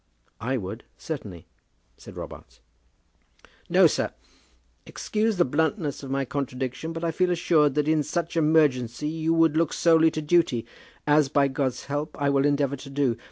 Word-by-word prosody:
"I 130 +4 -1
would, 105 +1 -6
certainly," 100 - -7 0.5
said - - -13
Robarts. - - -10 1.1
"No, - - +5
sir! - - +1 0.8
Excuse 215 -1 -1
the 175 - +4
bluntness 155 +2 -1
of 135 - -8
my 135 0 -1
contradiction, 130 +2 -4
but 165 0 -6
I 165 - 0
feel 180 +3 +1
assured 160 -5 +2
that 150 0 +1
in 155 -1 +3
such 170 +3 -3
emergency 150 -5 +2
you 160 0 -1
would 165 -2 +3
look 165 -1 +2
solely 165 -1 +4
to 155 - -4
duty, 150 -7 +2 0.4
as 150 -1 +3
by 140 -1 +2
God's 135 -2 -2
help, 145 +2 -4
I 140 -1 +1
will 140 +1 +3
endeavour 140 -1 0
to 135 +1 -11
do. 135 -4 0
145 Hz, 160 wpm, -25 LUFS, 135-160 Hz, 1.1 s, No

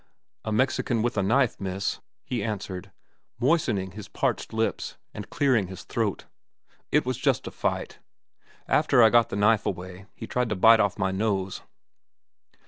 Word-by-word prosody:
"A 110 - -3
Mexican 120 0 +1
with 120 - -1
a 100 - +1
knife, 120 +5 +2
miss," 95 0 -3 0.2
he 120 -5 -3
answered, 100 -4 -5 0.5
moistening 120 - +1
his 105 +1 -9
parched - - -2
lips 110 0 -2 0.2
and 105 - -8
clearing 130 -9 +2
his 95 0 -9
throat. 110 -4 -2 0.7
"It - - +3
was - - -2
just - - +1
a - - -6
fight. - - -3 0.7
After 140 -5 +4
I 110 - +6
got 120 -1 +4
the - - -4
knife 105 +1 +3
away, 95 +1 -6
he - - -7
tried 125 -2 -1
to 105 - -1
bite 115 +4 +6
off 100 -2 +1
my 95 0 0
nose." 95 -1 -1
105 Hz, 160 wpm, -26 LUFS, 95-120 Hz, 0.7 s, I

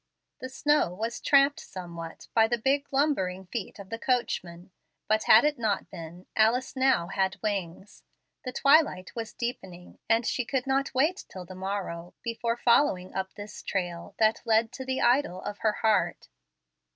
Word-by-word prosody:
The 260 - -6
snow 290 -9 +1
was 225 +4 -4
tramped 280 0 +4
somewhat 170 -3 -9
by 225 -1 +5
the 240 +1 0
big 275 +4 0
lumbering 190 -11 0
feet 210 +2 -6
of 200 -1 -11
the 225 - -4
coach 250 -6 0
man, 175 +1 -13 0.4
but 215 0 +1
had 225 +6 +7
it 300 -3 0
not 210 -4 -1
been, 170 0 -9
Alice 230 +5 +2
now 260 -9 +3
had 190 0 -1
wings. 195 -2 -4 0.4
The 255 - -4
twilight 275 - +3
was 230 -2 -5
deepening, 190 -8 -6
and 225 +1 +3
she 250 - 0
could 255 +1 -2
not 270 0 0
wait 315 +9 +1
till 185 -1 -8
the 185 - -10
morrow 185 -2 -5
before 230 0 -2
following 235 -7 +2
up 190 0 -4
this 205 0 -9
trail 175 -3 -4
that 220 0 +3
led 225 0 +2
to 260 - -7
the 260 0 -2
idol 240 -7 +2
of 205 - -6
her 215 - +2
heart. 220 -1 +1
220 Hz, 170 wpm, -28 LUFS, 185-255 Hz, 0.4 s, had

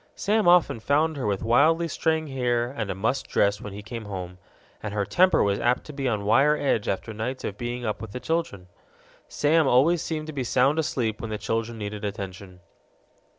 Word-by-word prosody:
Sam 210 0 +1
often 175 -9 +4
found 150 +6 +1
her 135 -6 -3
with 100 0 -1
wildly 155 +9 +3
straying 160 0 0
hair 120 -2 0
and 110 -7 -4
a - - -2
mussed 115 +7 -1
dress 100 0 +1
when 105 - -7
he 100 +1 -8
came 115 +1 -7
home, 90 -2 -7 0.4
and 105 -1 -5
her 100 -1 0
temper 185 - +4
was 100 -1 +1
apt 125 +2 +1
to 150 - -10
be 140 -1 -2
on 105 -4 -1
wire 135 +8 +4
edge 115 -7 0
after 105 +3 -3
nights 120 +5 -4
of 100 - -4
being 120 +2 -4
up 105 - -3
with 110 -3 -7
the 125 - -5
children. 160 - -2 0.6
Sam 155 0 +2
always 150 +7 +4
seemed 155 -2 -3
to 155 - -7
be 135 -2 -2
sound 130 +5 +2
asleep 115 -8 -1
when 115 - -5
the 105 - -3
children 115 +2 -3
needed 105 0 -6
attention. 95 -2 -6
120 Hz, 205 wpm, -25 LUFS, 105-145 Hz, 0.6 s, often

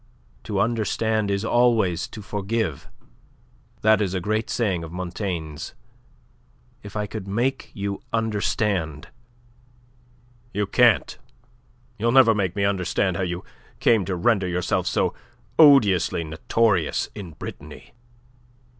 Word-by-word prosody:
To 105 -3 -2
understand 110 -1 0
is 100 +2 -1
always 115 -8 +2
to 105 - -10
forgive. 105 - -3 1.0
That 110 0 +5
is 95 -2 -1
a - - 0
great 110 +4 -1
saying 95 -8 0
of 80 - -8
Montaigne's. 90 -4 -5 1.1
If 100 0 -11
I 105 -1 -1
could 105 -1 -7
make 120 +7 -1
you 100 -1 -4
understand..." 100 -7 -1 1.5
"You 105 0 +1
can't. 115 +2 +3 0.8
You'll 115 +2 +2
never 125 -3 +6
make 95 -4 -1
me 100 - 0
understand 95 -1 0
how 95 - -2
you 90 0 -3 0.4
came 115 -4 +3
to 95 - -2
render 95 +1 +2
yourself 90 0 -1
so - - +1 0.5
odiously 110 - +5
notorious 85 +3 0
in 95 -6 -8
Brittany." - - -10
100 Hz, 120 wpm, -24 LUFS, 90-110 Hz, 1.5 s, never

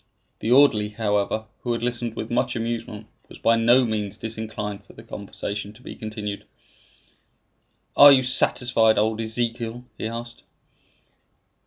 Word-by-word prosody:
The 110 - -3
orderly, 125 -6 +5
however, 105 0 -1 0.2
who 120 - -1
had 115 - -4
listened 120 -1 -2
with 110 - -5
much 125 +1 0
amusement, 115 -2 -4 0.2
was - - -12
by 115 - +3
no 120 +3 +4
means 105 -3 -3
disinclined 110 -2 -5
for - - -17
the 110 - -13
conversation 100 -1 -6
to - - -18
be - - -8
continued. 105 -2 -6 1.5
"Are 145 0 +10
you 130 -2 +5
satisfied, 125 -3 +2
old 110 +1 +1
Ezekiel?" 115 +1 -3 0.2
he - - -2
asked. 120 +1 -7
115 Hz, 140 wpm, -24 LUFS, 105-120 Hz, 1.5 s, Are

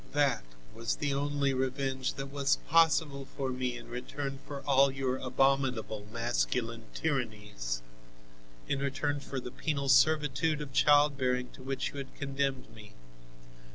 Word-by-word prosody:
That 145 -1 +2 0.3
was 115 0 -2
the 145 -1 -1
only 140 0 +1
revenge 130 0 -1
that 135 0 -5
was 140 -1 +2
possible 155 -4 +3
for 135 -2 -1
me 125 -1 -2
in 120 - -11
return 135 +3 -5
for 140 -1 -5
all 140 0 +5
your 130 -1 -1
abominable 130 -5 +1
masculine 115 0 -1
tyrannies, 105 - -2 0.8
in 140 - 0
return 140 +1 -1
for 135 -1 -5
the 125 -1 -7
penal 140 -1 -2
servitude 150 +1 +4
of 145 -3 -6
childbearing 140 -4 +3
to - - -13
which 135 +1 -2
you - - -9
have 135 -1 -8
condemned 135 -4 -2
me. 105 -2 -13
135 Hz, 140 wpm, -31 LUFS, 125-140 Hz, 0.8 s, all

